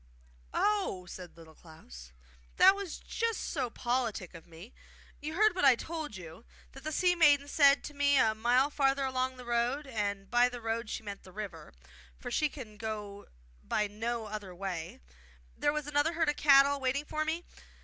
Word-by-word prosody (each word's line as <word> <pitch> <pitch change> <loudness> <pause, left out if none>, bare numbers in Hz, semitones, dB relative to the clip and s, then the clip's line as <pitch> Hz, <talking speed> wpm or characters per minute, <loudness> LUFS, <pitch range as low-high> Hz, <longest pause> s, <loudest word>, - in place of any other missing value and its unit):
'Oh!' 395 - 0
said 180 -1 -10
Little 160 -1 -14
Klaus, 60 - -14 0.5
'that 385 - +8
was 395 -5 -5
just 460 -1 -2
so 260 -6 -2
politic 240 -7 -2
of 165 0 -12
me. 170 +7 -13 0.5
You 310 +2 -5
heard 430 +3 +4
what 370 - -2
I 270 -3 +7
told 315 -2 -6
you, 170 +2 -10 0.3
that 270 - -13
the 310 - -3
sea 360 +3 +3
maiden 290 -4 +4
said 285 -1 +4
to 295 - -7
me 285 0 +3
a 220 -4 +4
mile 245 +6 +2
farther 275 -1 +1
along 260 0 -1
the 250 - -10
road 240 +5 0
and 205 -5 -3
by 245 +1 +4
the 245 -1 -7
road 225 0 -3
she - - -5
meant 200 -1 -7
the 185 - -15
river, 185 -6 -8 0.5
for - - -7
she 305 - +1
can 230 -8 -10
go 210 -2 -6 0.4
by 210 - 0
no 225 +2 -3
other 205 -4 -7
way 175 - -5 0.5
there 290 - +1
was 300 -1 -3
another 295 +2 +1
herd 325 -2 +1
of 295 - 0
cattle 280 -1 +5
waiting 270 +2 -1
for 310 +1 -2
me. 320 +3 -3
250 Hz, 185 wpm, -31 LUFS, 205-290 Hz, 0.5 s, that